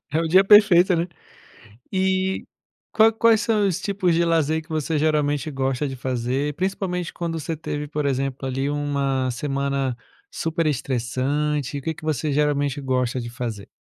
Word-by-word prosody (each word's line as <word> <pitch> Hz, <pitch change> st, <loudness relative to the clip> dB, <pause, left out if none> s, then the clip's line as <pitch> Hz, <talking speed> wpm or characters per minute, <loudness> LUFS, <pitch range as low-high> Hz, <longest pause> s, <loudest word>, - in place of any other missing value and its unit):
É 160 Hz, -, +2 dB
o 165 Hz, -, -1 dB
dia 185 Hz, +4 st, +6 dB
perfeito, 195 Hz, -3 st, +6 dB
né. 170 Hz, +1 st, 0 dB, 0.9 s
E, 190 Hz, 0 st, 0 dB, 0.5 s
qual 220 Hz, +1 st, +5 dB
quais 230 Hz, 0 st, +4 dB
são 215 Hz, -3 st, +2 dB
os 175 Hz, -, -1 dB
tipos 195 Hz, -4 st, 0 dB
de 170 Hz, +1 st, +2 dB
lazer 160 Hz, -1 st, +1 dB
que 160 Hz, -, -22 dB
você 155 Hz, 0 st, -1 dB
geralmente 150 Hz, 0 st, +1 dB
gosta 135 Hz, +1 st, -1 dB
de 135 Hz, -, -5 dB
fazer? 130 Hz, +3 st, -2 dB
Principalmente 180 Hz, -1 st, -2 dB
quando 165 Hz, -2 st, -3 dB
você 160 Hz, +2 st, -3 dB
teve, 150 Hz, -1 st, -5 dB
por 150 Hz, 0 st, -3 dB
exemplo, 135 Hz, 0 st, -1 dB
ali, 135 Hz, +2 st, -1 dB
uma 140 Hz, -3 st, -1 dB
semana 140 Hz, -1 st, -2 dB, 0.4 s
super 165 Hz, 0 st, -2 dB
estressante, 140 Hz, +2 st, -1 dB
o -, -, -5 dB
que 160 Hz, +4 st, -2 dB
que -, -, -15 dB
você 155 Hz, -1 st, -1 dB
geralmente 145 Hz, -1 st, +1 dB
gosta 130 Hz, -1 st, 0 dB
de 120 Hz, -, -6 dB
fazer? 115 Hz, -4 st, -5 dB
150 Hz, 165 wpm, -23 LUFS, 135-170 Hz, 0.9 s, dia